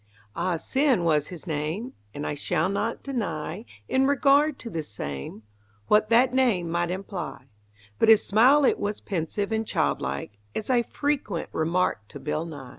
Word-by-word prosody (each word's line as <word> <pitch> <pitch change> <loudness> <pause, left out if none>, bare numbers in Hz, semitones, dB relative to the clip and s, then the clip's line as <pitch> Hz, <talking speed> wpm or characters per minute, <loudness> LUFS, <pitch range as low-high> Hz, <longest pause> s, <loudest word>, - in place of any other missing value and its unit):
Ah 175 +1 0
Sin 260 - +1
was 155 -3 +2
his 180 -2 -9
name, 160 - -3 0.2
And 145 +5 -5
I - - -1
shall 155 +4 0
not 205 +4 -2
deny 210 - -3 0.2
In 265 +1 +2
regard 285 +1 +4
to 235 - -8
the 165 - -2
same 100 - -6 0.5
What 215 0 +4
that 245 +2 +4
name 220 -11 +2
might 175 0 0
imply; 180 -8 -5 0.5
But - - +4
his 220 -1 +7
smile 260 +8 +5
it - - +3
was 205 0 -2
pensive 195 +3 -3
and 220 0 +1
childlike, 100 - -2 0.2
As 220 - -2
I 245 -1 +4
frequent 265 - -2
remarked 160 - 0
to 145 - -7
Bill 150 +3 -2
Nye. 145 -6 -8
190 Hz, 165 wpm, -26 LUFS, 155-240 Hz, 0.5 s, his